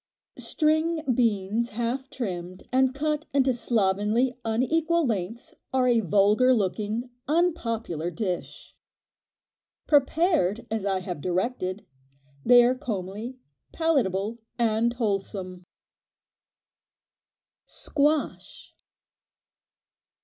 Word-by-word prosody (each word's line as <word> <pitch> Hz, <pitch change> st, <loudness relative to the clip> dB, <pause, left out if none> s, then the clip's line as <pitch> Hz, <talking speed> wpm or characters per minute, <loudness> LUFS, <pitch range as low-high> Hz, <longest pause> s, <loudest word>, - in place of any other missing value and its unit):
String 315 Hz, +1 st, +1 dB
beans 225 Hz, -1 st, +1 dB
half 240 Hz, +4 st, -3 dB
trimmed 185 Hz, -7 st, -6 dB
and 260 Hz, +1 st, +2 dB
cut 300 Hz, +1 st, -1 dB
into 265 Hz, -2 st, +3 dB
slovenly, 225 Hz, +2 st, +1 dB
unequal 320 Hz, +9 st, +1 dB
lengths 225 Hz, 0 st, -3 dB, 0.2 s
are 260 Hz, -1 st, +2 dB
a 240 Hz, -2 st, +4 dB
vulgar 210 Hz, +6 st, +4 dB
looking, 215 Hz, +4 st, -2 dB, 0.2 s
unpopular 230 Hz, -, 0 dB
dish. 180 Hz, 0 st, -5 dB, 1.1 s
Prepared 285 Hz, -, +2 dB
as 220 Hz, -3 st, -1 dB
I 190 Hz, -1 st, 0 dB
have 180 Hz, -4 st, -5 dB
directed, 185 Hz, -, -2 dB, 0.6 s
they 245 Hz, -1 st, +7 dB
are 245 Hz, +1 st, +3 dB
comely, 220 Hz, -1 st, -5 dB, 0.4 s
palatable 235 Hz, -, 0 dB, 0.2 s
and 230 Hz, 0 st, +1 dB
wholesome. 195 Hz, -5 st, -3 dB, 2.0 s
Squash. 295 Hz, +1 st, -1 dB
235 Hz, 85 wpm, -26 LUFS, 195-265 Hz, 2.0 s, they